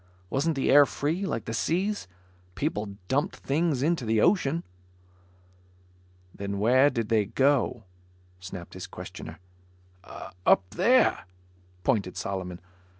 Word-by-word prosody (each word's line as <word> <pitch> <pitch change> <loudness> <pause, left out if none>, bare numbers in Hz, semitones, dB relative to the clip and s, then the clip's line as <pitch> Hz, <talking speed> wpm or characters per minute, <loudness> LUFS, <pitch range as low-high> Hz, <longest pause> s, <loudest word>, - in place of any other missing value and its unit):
Wasn't 150 +4 +1
the 135 - +1
air 145 0 +8
free, 165 +7 -2
like 115 - -3
the 115 - -4
seas? 185 - -1 0.5
People 105 -9 -3
dumped 140 +6 0
things 145 -2 0
into 160 -3 +1
the 110 -1 +1
ocean. 170 - +2 1.7
"Then 100 0 -4
where 130 +7 +5
did 115 -5 -3
they 110 -3 +3
go?" 135 +4 +1 0.6
snapped 90 -1 -8
his - - -7
questioner. - - -9 1.1
"Up 95 - +4
there," 240 +8 +3 0.6
pointed 100 -8 0
Solomon. 90 -2 -4
135 Hz, 115 wpm, -27 LUFS, 105-160 Hz, 1.7 s, air